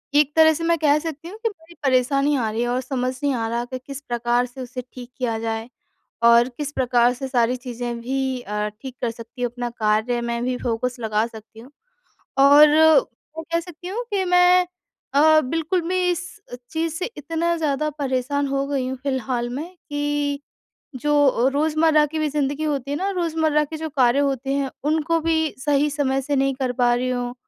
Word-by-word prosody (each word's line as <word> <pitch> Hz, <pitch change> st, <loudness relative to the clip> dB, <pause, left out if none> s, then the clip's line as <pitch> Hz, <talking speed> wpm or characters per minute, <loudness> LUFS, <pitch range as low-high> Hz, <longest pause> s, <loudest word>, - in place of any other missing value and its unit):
एक 295 Hz, 0 st, +3 dB
तरह 315 Hz, 0 st, +6 dB
से 330 Hz, +2 st, -5 dB
मैं 335 Hz, 0 st, +2 dB
कह 295 Hz, -1 st, +4 dB
सकती 320 Hz, 0 st, -6 dB
हूँ 405 Hz, +5 st, -9 dB
कि 455 Hz, -, +2 dB
बड़ी 340 Hz, -4 st, -17 dB
परेशानी 275 Hz, +2 st, +2 dB
आ 225 Hz, -3 st, 0 dB
रही 225 Hz, +2 st, -2 dB
है 240 Hz, -, 0 dB
और 250 Hz, +1 st, 0 dB
समझ 255 Hz, -1 st, -2 dB
नहीं 285 Hz, -, +2 dB
आ 225 Hz, -1 st, -1 dB
रहा 235 Hz, +1 st, -2 dB
कि 255 Hz, +1 st, -6 dB
किस 275 Hz, 0 st, -7 dB
प्रकार 240 Hz, 0 st, +1 dB
से 250 Hz, +2 st, -10 dB
उसे 250 Hz, 0 st, -6 dB
ठीक 245 Hz, -1 st, -9 dB
किया 235 Hz, -3 st, -1 dB
जाए 225 Hz, +1 st, -3 dB, 0.5 s
और 235 Hz, +1 st, +6 dB
किस 290 Hz, +3 st, -5 dB
प्रकार 245 Hz, -2 st, +2 dB
से 265 Hz, +2 st, -5 dB
सारी 250 Hz, -1 st, +1 dB
चीज़ें 240 Hz, -1 st, -5 dB
भी 265 Hz, +1 st, -2 dB
अ, 210 Hz, -1 st, -3 dB
ठीक 265 Hz, -2 st, -8 dB
कर 240 Hz, -, 0 dB
सकती 230 Hz, +2 st, -11 dB
हूँ 245 Hz, -1 st, 0 dB
अपना 245 Hz, 0 st, -4 dB
कार्य 220 Hz, +1 st, 0 dB
मैं 235 Hz, 0 st, -2 dB
भी 250 Hz, 0 st, -1 dB
फ़ोकस 245 Hz, +1 st, -2 dB
लगा 220 Hz, -1 st, 0 dB
सकती 220 Hz, -1 st, -13 dB
हूँ। 250 Hz, +5 st, -14 dB, 0.7 s
और 285 Hz, +2 st, +8 dB
मैं 310 Hz, -1 st, +2 dB
कह 335 Hz, -, +2 dB
सकती 355 Hz, 0 st, -10 dB
हूँ 450 Hz, +6 st, -3 dB
कि 390 Hz, -2 st, +1 dB
मैं 360 Hz, 0 st, +5 dB, 0.5 s
अ, 310 Hz, +2 st, +6 dB
बिल्कुल 325 Hz, +6 st, -1 dB
भी 370 Hz, 0 st, +1 dB
इस 350 Hz, +1 st, -3 dB, 0.4 s
चीज़ 320 Hz, 0 st, -2 dB
से 360 Hz, +2 st, -2 dB
इतना 330 Hz, +3 st, -1 dB
ज़्यादा 305 Hz, -1 st, 0 dB
परेशान 280 Hz, +1 st, -1 dB
हो 275 Hz, 0 st, -1 dB
गई 275 Hz, -3 st, -1 dB
हूँ 260 Hz, -, -4 dB
फ़िलहाल 255 Hz, -3 st, -1 dB
में 280 Hz, +6 st, -4 dB, 0.2 s
कि 290 Hz, -1 st, -1 dB, 0.6 s
जो 280 Hz, -2 st, +3 dB
रोज़मर्रा 310 Hz, +1 st, +3 dB
की 315 Hz, +2 st, -5 dB
भी 310 Hz, -1 st, +1 dB
ज़िंदगी 290 Hz, +1 st, -1 dB
होती 280 Hz, -3 st, -2 dB
है 285 Hz, -, -1 dB
ना 385 Hz, +5 st, -1 dB
रोज़मर्रा 320 Hz, -3 st, +1 dB
के 315 Hz, +2 st, -7 dB
जो 315 Hz, 0 st, -4 dB
कार्य 260 Hz, -2 st, +3 dB
होते 270 Hz, -1 st, -1 dB
हैं 275 Hz, -2 st, -1 dB, 0.2 s
उनको 320 Hz, +1 st, +1 dB
भी 320 Hz, -1 st, 0 dB
सही 290 Hz, +2 st, +2 dB
समय 270 Hz, -2 st, 0 dB
से 285 Hz, +2 st, -1 dB
नहीं 270 Hz, 0 st, +1 dB
कर 255 Hz, -1 st, -2 dB
पा 240 Hz, 0 st, +4 dB
रही 250 Hz, +1 st, -1 dB
हूँ 245 Hz, -1 st, -2 dB
275 Hz, 200 wpm, -22 LUFS, 245-310 Hz, 0.7 s, और